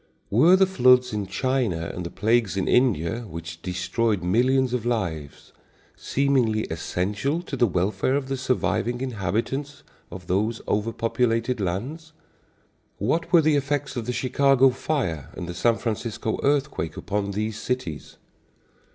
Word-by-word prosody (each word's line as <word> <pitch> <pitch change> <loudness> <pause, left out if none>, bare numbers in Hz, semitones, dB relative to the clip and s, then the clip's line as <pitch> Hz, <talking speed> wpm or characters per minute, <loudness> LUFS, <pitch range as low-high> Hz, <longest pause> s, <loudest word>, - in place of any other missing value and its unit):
Were 155 - +6
the 190 0 +5
floods 125 - +4
in 105 -2 -2
China 100 -6 -1
and 90 - -5
the 85 - -5
plagues 110 -2 +1
in 95 - 0
India, 115 -6 +2
which 85 -1 -8
destroyed 95 +3 -1
millions 125 +7 +2
of 125 -3 -1
lives, 85 -12 -3 0.4
seemingly 125 -6 +1
essential 100 - -2
to 150 - -5
the 120 -2 +3
welfare 95 +7 0
of 140 -2 -1
the 135 - -2
surviving 125 -1 -1
inhabitants 135 +5 -3 0.3
of 90 +1 -9
those 105 +6 0
overpopulated 115 +2 0
lands? 130 - -4 0.8
What 165 - -1
were 170 -3 +7
the 155 0 +3
effects 145 0 -1
of 120 -2 -4
the - - 0
Chicago 135 +2 +3
fire 120 - -2
and 90 - -5
the 90 - -5
San 115 +6 +2
Francisco 110 -1 -3
earthquake 140 - 0
upon 100 0 -2
these 110 +2 -3
cities? 110 - -4
115 Hz, 140 wpm, -24 LUFS, 95-130 Hz, 0.8 s, were